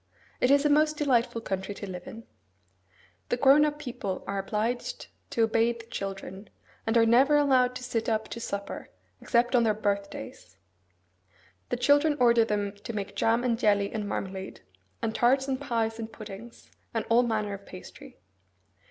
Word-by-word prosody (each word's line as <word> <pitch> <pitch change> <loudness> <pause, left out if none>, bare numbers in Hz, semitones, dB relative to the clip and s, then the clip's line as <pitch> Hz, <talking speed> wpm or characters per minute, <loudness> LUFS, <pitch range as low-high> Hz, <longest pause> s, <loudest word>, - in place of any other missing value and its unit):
It 250 - +3
is 280 +1 +4
a - - +4
most 305 +1 +3
delightful 245 -5 +1
country 190 -1 -4
to 200 - -7
live 180 -1 -7
in. 225 +1 -9 1.1
The 245 - +1
grown 275 +3 +6
up 295 -1 -2
people 245 -9 -5
are 195 0 -2
obliged 230 - -3 0.2
to 230 - +1
obey 225 +1 +2
the 230 -1 -12
children, 195 -2 -6 0.4
and 225 +1 +3
are 230 - +5
never 265 +6 +5
allowed 255 -3 +3
to 250 - -6
sit 235 -3 -2
up 220 -1 0
to 235 - -6
supper, 200 -3 -5 0.3
except 240 +1 +2
on 245 - +5
their 220 -2 +2
birthdays. 200 - -4 1.1
The - - -1
children 290 +4 +3
order 235 -2 +5
them 205 -2 -1
to 230 +3 -7
make 200 -1 -5
jam 230 +4 +2
and 235 -2 0
jelly 205 -3 +2
and 210 -2 -3
marmalade, 190 0 -5 0.4
and 220 - 0
tarts 265 +4 +3
and 265 0 -2
pies 230 -4 -1
and 225 0 -5
puddings, 220 +1 -11 0.2
and 225 - -1
all 230 +1 +5
manner 215 -4 -1
of 200 0 -9
pastry. 180 - -12
230 Hz, 170 wpm, -28 LUFS, 205-250 Hz, 1.1 s, grown